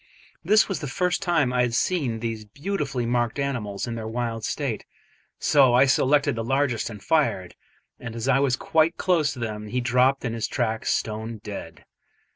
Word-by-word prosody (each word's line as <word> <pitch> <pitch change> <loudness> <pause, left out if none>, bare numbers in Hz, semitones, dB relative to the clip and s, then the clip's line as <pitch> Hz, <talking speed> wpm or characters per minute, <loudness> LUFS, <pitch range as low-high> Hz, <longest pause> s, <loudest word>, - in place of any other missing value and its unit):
This 215 +5 +4
was 195 - -3
the 150 - -5
first 180 +7 0
time 165 -9 +1
I 125 - +2
had 120 -1 0
seen 130 -9 0
these 115 -2 -3
beautifully 140 - -3
marked 120 +1 0
animals 120 -8 -2
in 120 - -4
their 110 -1 -5
wild 115 -1 -3
state, - - -2 0.5
so 135 -4 +4
I 130 +2 +6
selected 140 +1 +3
the 115 0 -3
largest 135 -1 0
and 105 -3 -10
fired, 145 - +1 0.5
and 115 -1 -7
as 115 +2 -4
I 135 0 +4
was 135 -2 +2
quite 160 +4 +1
close 165 -6 +2
to 130 - -10
them 105 -2 -4
he 125 +4 -1
dropped 125 +3 +2
in 115 - -2
his 115 -1 -2
tracks 115 -4 -1
stone 110 +1 -2
dead. 85 -6 -8
125 Hz, 185 wpm, -25 LUFS, 115-140 Hz, 0.5 s, I